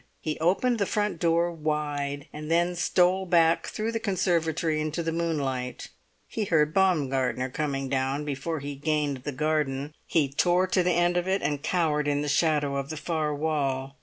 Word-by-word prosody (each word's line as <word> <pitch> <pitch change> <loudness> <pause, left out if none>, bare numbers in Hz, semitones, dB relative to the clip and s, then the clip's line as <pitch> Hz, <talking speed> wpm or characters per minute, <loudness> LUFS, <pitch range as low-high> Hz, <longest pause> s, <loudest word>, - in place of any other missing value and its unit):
He 155 -1 -4
opened 210 +9 +2
the 200 - +1
front 205 -5 -1
door 170 +1 +2
wide, 145 -3 -2
and 150 +1 -7
then 175 +2 +2
stole 180 +2 +2
back 165 -1 +3
through 220 +1 -3
the 225 - -2
conservatory 165 -6 0
into 155 +2 -2
the 165 - -1
moonlight. 140 -7 -2 0.4
He 220 - -3
heard 155 -4 +2
Baumgartner 135 -8 +1
coming 140 -2 -2
down 135 +2 -1
before 150 +2 -3
he 145 +1 -5
gained 145 -1 -1
the 135 +3 -5
garden. 150 0 -1
He 155 -4 +2
tore 180 +4 +3
to 185 0 +1
the 180 0 +2
end 175 +1 +2
of 175 +1 -1
it, 190 +1 0
and 145 0 -1
cowered 150 -4 0
in 145 0 +1
the 150 - -2
shadow 145 -2 +2
of 140 0 -4
the 155 - -5
far 155 -2 -1
wall. 140 -3 -1
155 Hz, 180 wpm, -27 LUFS, 145-175 Hz, 0.4 s, back